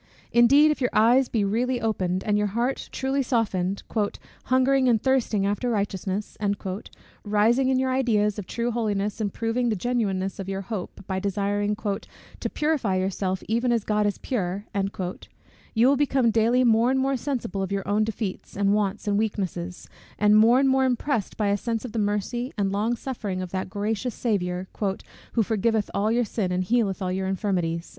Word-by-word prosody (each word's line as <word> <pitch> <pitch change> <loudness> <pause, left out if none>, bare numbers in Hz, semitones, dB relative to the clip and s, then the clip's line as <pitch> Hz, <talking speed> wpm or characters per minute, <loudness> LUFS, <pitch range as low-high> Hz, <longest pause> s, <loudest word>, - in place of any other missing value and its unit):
Indeed, 280 +6 +6
if 300 - -3
your 250 - +2
eyes 240 +4 +4
be 220 -3 +1
really 240 +5 0
opened, 190 -5 -1
and 210 - +1
your 210 0 +2
heart 245 +3 -1
truly 270 +1 0
softened, 200 -7 0 0.6
"hungering 260 0 +3
and 230 -2 +4
thirsting 235 -6 +1
after 205 +5 0
righteousness," 200 -2 -2 0.9
rising 225 +5 +3
in 260 - +3
your 260 0 +1
ideas 210 -5 +1
of 195 - -7
true 235 +1 -2
holiness, 210 -2 -1
and 205 -2 -1
proving 235 +3 -1
the 220 - +1
genuineness 195 -3 -1
of 195 0 -5
your 195 0 -2
hope 195 -2 -6
by 190 -1 -2
desiring 205 +1 0
"to 205 -2 -6
purify 295 -11 0
yourself 185 0 -1
even 235 +3 +1
as 230 -3 +1
God 210 0 +1
is 205 - -1
pure;" 200 -5 -3 1.1
you 230 +3 +5
will 280 - +5
become 265 -4 +2
daily 230 +3 +3
more 230 0 +4
and 265 0 +2
more 270 +1 +1
sensible 245 -7 -3
of 190 0 -3
your 195 -1 -2
own 205 +2 +2
defeats, 215 -4 -4
and 200 0 +3
wants, 210 0 -1
and 205 0 +2
weaknesses; 185 -5 -3 0.3
and 210 0 +4
more 225 +3 +6
and 275 - +3
more 265 0 +3
impressed 255 -3 -1
by 210 -2 +1
a 200 - +3
sense 230 +2 -3
of 245 - -6
the 225 - -2
mercy 210 +5 -1
and 195 -2 0
long 215 +4 0
suffering 220 -7 -4
of 185 -1 -5
that 185 0 -3
gracious 215 +4 -2
Saviour, 185 -5 -1 0.7
"who 230 - +3
forgiveth 220 0 0
all 210 +2 +1
your 240 +1 +2
sin, 200 -3 -2
and 180 +1 0
healeth 205 -2 0
all 180 - -1
your 190 +1 -2
infirmities." 180 -4 -1
215 Hz, 180 wpm, -25 LUFS, 195-245 Hz, 1.1 s, Indeed